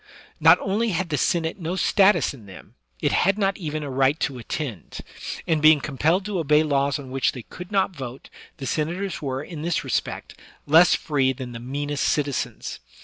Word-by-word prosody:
Not 160 +3 +7
only 215 +4 0
had 180 -2 -1
the 150 - 0
Senate 165 +4 0
no 170 +1 -3
status 195 -1 +3
in 115 -7 -14
them 95 - -13
— - - -32
it - - +2
had 195 +2 +2
not 195 -2 +1
even 155 -3 -4
a 145 - -5
right 135 +3 +2
to 135 -5 -2
attend; 120 - -5 0.4
and, 160 -2 +1
being 155 0 +7
compelled 150 +7 0
to 205 -3 -2
obey 150 -1 +3
laws 140 -1 +1
on 135 -3 -9
which 135 -1 +1
they 125 - -8
could 180 - -10
not 195 -2 +1
vote, 130 -2 -8 0.3
the 135 - -6
senators 170 +7 -2
were, 135 -1 -3
in 160 -1 -8
this 170 +1 -1
respect, - - -3 0.3
less 165 +4 +6
free 135 -4 +1
than 125 -1 -7
the 115 - -7
meanest 145 +3 -3
citizens. 145 -3 -2
150 Hz, 195 wpm, -24 LUFS, 135-175 Hz, 0.4 s, Not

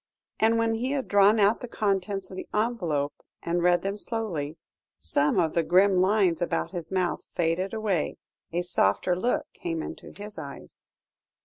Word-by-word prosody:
And 225 +1 +4
when 230 0 +2
he 250 +5 -1
had 275 -2 -2
drawn 205 +2 +5
out 205 +2 +4
the 245 - -5
contents 195 -3 -1
of - - -7
the - - -6
envelope, 175 -11 0 0.3
and 175 +1 0
read 175 0 +3
them 195 +1 -2
slowly, 180 -10 -3 0.4
some 140 - +1
of 160 -2 +2
the 170 - +3
grim 185 +4 +4
lines 185 -2 +3
about 175 - -1
his 175 -2 -6
mouth 185 -2 0
faded 175 +3 0
away, 215 -7 -1 0.3
a 175 +1 -1
softer 175 - +2
look 235 +8 0
came 165 -2 -4
into - - -8
his 205 +1 -9
eyes. 140 -1 -9
190 Hz, 170 wpm, -27 LUFS, 170-210 Hz, 0.4 s, drawn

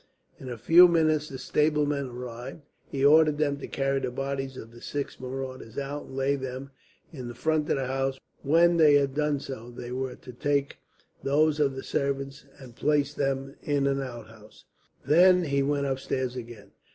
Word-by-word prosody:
In 130 - -8
a 120 - -5
few 165 +10 +7
minutes 155 -3 +2
the 135 - -7
stablemen 150 0 +1
arrived. 125 +3 -8 0.3
He 135 0 0
ordered 155 0 +6
them 145 -2 0
to - - -7
carry 135 0 0
the 135 - -2
bodies 135 0 -4
of 115 - -9
the 120 0 -14
six 145 -1 -5
marauders 130 -2 -6
out, 140 +1 -4
and 130 - -11
lay 135 +1 +1
them 130 0 -6 0.4
in 125 -5 -6
front 155 +2 0
of - - +3
the 135 -1 -2
house. 135 +1 -2 0.2
When 170 +4 +4
they 150 -3 +6
had 140 -2 +2
done 150 0 0
so, 120 -4 -8
they 120 0 -8
were 130 0 -3
to 125 - -12
take 140 +1 -1 0.4
those 150 +2 +2
of 140 -3 +2
the 135 - -6
servants 140 0 -3
and 130 -4 -13
place 145 0 +1
them 135 -1 -2
in 145 -2 0
an 140 0 +1
outhouse. 115 -4 -10 0.4
Then 180 +5 +6
he 140 -3 0
went 140 0 0
upstairs 130 -1 -2
again. 115 -4 -9
135 Hz, 180 wpm, -27 LUFS, 130-145 Hz, 0.4 s, few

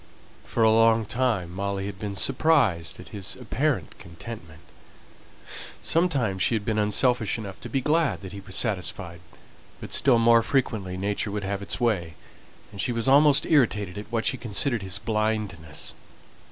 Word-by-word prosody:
For 115 - 0
a 110 - +6
long 115 0 +4
time 110 -7 -1
Molly 100 +1 -3
had 100 -1 -6
been 105 -2 -4
surprised 115 - +1
at 90 - -11
his 100 -3 -5
apparent 130 +3 -2
contentment; 85 -2 -10 1.2
sometimes 135 - 0
she 115 - +2
had 105 -2 -3
been 110 -2 0
unselfish 110 +2 +2
enough 100 -4 -8
to - - -7
be 135 - 0
glad 155 +2 +1
that 95 -2 -8
he 100 - -8
was 100 0 -7
satisfied; 90 -5 -2 0.6
but - - -7
still 130 -4 +4
more 115 0 +5
frequently 110 -8 -1
nature 100 +2 -1
would 100 0 -3
have 100 +1 -3
its 100 - -4
way, 95 -9 0 0.6
and 100 -1 -4
she 125 - +1
was 115 +1 -1
almost 140 +1 +6
irritated 105 - +2
at 105 +2 -8
what 115 -1 -1
she 130 - +1
considered 120 +1 -1
his 95 -1 -1
blindness. 105 -8 -2
110 Hz, 165 wpm, -25 LUFS, 95-120 Hz, 1.2 s, a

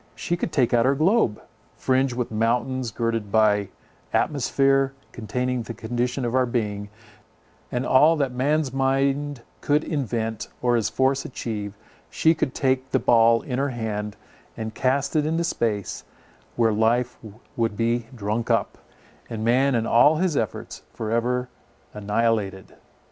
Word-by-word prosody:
She 175 - -2
could 170 - -3
take 125 -6 +1
our 125 +3 +3
globe, 160 - +2 0.4
fringed 130 -1 +1
with 125 -2 -3
mountains, 120 +3 0
girded 115 -2 -2
by 105 -2 +3 0.4
the - - +3
atmosphere, 135 -1 +2 0.2
containing 125 +3 -2
the 115 0 -7
condition 120 +3 -2
of 120 - -2
our 130 -1 +2
being, 105 -4 -2 0.8
and 125 +1 -1
all 150 +5 +5
that 140 -4 0
man's 140 +2 0
mind 135 0 0 0.2
could 150 +1 +2
invent 115 -7 -2
or 120 -1 +2
his 110 -5 +1
force 135 +1 +1
achieve; 105 -5 -5 0.3
she 160 - +3
could 145 -5 -2
take 130 -1 0
the - - +2
ball 115 0 +4
in 125 -2 -3
her 140 +1 0
hand, 105 -4 -4 0.4
and 110 0 -5
cast 135 +5 0
it 150 - +3
into 165 +2 0
space, 110 - -2 0.5
where 115 -2 +2
life 115 +3 +1 0.4
would 115 -3 -1
be 115 0 0
drunk 110 +1 -2
up, - - 0 0.5
and 110 -1 -4
man 130 +3 +3
and 115 -1 0
all 135 +7 +5
his 175 -1 0
efforts 110 -6 -3
for 110 -1 -5
ever 125 +2 0 0.5
annihilated. 105 -2 -1
120 Hz, 150 wpm, -24 LUFS, 110-135 Hz, 0.8 s, all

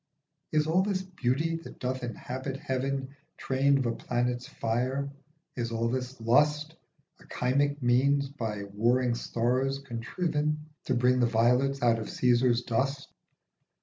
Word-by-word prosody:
Is 150 -1 +2
all 165 +4 +3
this 190 -1 -1
beauty 165 -2 -1
that 165 - -11
doth 130 +1 -3
inhabit 130 +3 -5
heaven 135 +1 -2 0.2
Train 135 +1 +2
of 135 - -1
a 120 - +1
planet's 120 +1 -2
fire? 130 +5 -1 0.4
Is 115 -2 -2
all 115 0 0
this 130 +1 -3
lust 150 +7 +2 0.5
A - - -18
chymic 140 +3 0
means 140 +3 +3
by 110 -7 -4
warring 120 +5 +1
stars 125 +3 0
contriven 150 +4 -2
To 130 - +1
bring 125 +1 +3
the 120 - +4
violets 125 +4 +2
out 115 -1 +4
of 110 - -5
Caesar's 120 -1 +3
dust 135 +4 -1
130 Hz, 140 wpm, -29 LUFS, 120-140 Hz, 0.5 s, the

